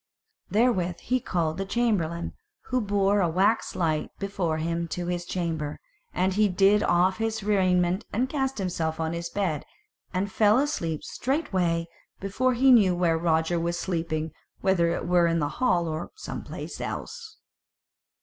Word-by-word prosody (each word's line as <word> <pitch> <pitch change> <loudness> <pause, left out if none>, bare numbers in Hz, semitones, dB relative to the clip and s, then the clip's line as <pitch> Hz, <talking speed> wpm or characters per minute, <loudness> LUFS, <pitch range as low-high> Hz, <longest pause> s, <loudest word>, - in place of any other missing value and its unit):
Therewith 195 -7 +1
he 255 +2 0
called 170 -6 -1
the - - 0
chamberlain, 190 -8 0 0.4
who 255 0 +2
bore 200 -1 +2
a 175 - +2
wax 195 +7 +1
light 160 -3 0
before 190 -5 -2
him 170 +1 -2
to 175 +2 -4
his 175 0 -2
chamber, 160 -5 -3 0.3
and 185 +1 +1
he 210 +1 +3
did 195 +3 +4
off 185 0 +3
his 225 -1 -2
raiment 185 -2 +2
and 245 +5 0
cast 270 -1 -2
himself 165 -4 -2
on 160 0 -1
his 170 0 -4
bed, 175 -8 -1 0.5
and 190 +2 -2
fell 210 +2 +4
asleep 175 - -1
straightway, 185 - -1 0.3
before 245 +6 0
he 265 +2 +5
knew 200 -7 +6
where 175 -2 +2
Roger 160 +1 +1
was 170 +1 -1
sleeping, 165 -3 -2 0.3
whether 180 -3 +3
it 170 - -2
were 175 -1 +4
in 165 0 +1
the 145 -3 0
hall 180 -10 +2
or 155 +1 -4
some 435 - -6
place - - -7
else. 460 -2 -6
180 Hz, 160 wpm, -26 LUFS, 170-210 Hz, 0.5 s, knew